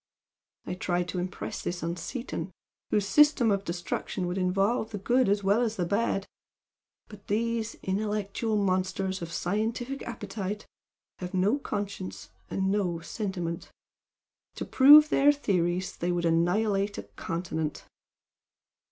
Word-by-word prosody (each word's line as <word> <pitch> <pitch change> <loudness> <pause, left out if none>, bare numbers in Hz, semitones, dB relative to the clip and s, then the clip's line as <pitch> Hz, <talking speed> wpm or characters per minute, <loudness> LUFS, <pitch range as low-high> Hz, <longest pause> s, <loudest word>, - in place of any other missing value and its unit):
I - - -3
tried 180 -1 -1
to 180 - -2
impress 180 +1 -4
this 175 -1 -4
on 170 +1 -1
Seaton, 200 - -5 0.4
whose 205 -2 +1
system 295 -4 +5
of 200 -1 +1
destruction 175 +1 -3
would 180 +2 -2
involve 195 +5 +1
the 210 - -5
good 240 +4 +2
as 205 0 +2
well 200 +4 +3
as 225 -2 0
the 180 - -1
bad 200 0 0 0.8
but 205 -1 -14
these 225 +1 -1
intellectual 210 +2 -1
monsters 190 -1 0
of 170 -1 -5
scientific 225 +9 -2
appetite 210 -3 -5 0.5
have 180 +1 -5
no 205 +9 +2
conscience 195 - -5 0.2
and 190 0 0
no 185 -5 0
sentiment. 175 -5 -4 0.9
To - - -4
prove 295 +3 +8
their 285 -1 +5
theories 185 -9 0
they 175 +1 -1
would 175 -1 0
annihilate 195 +5 +2
a - - -4
continent." 160 - -4
195 Hz, 135 wpm, -28 LUFS, 180-220 Hz, 0.9 s, prove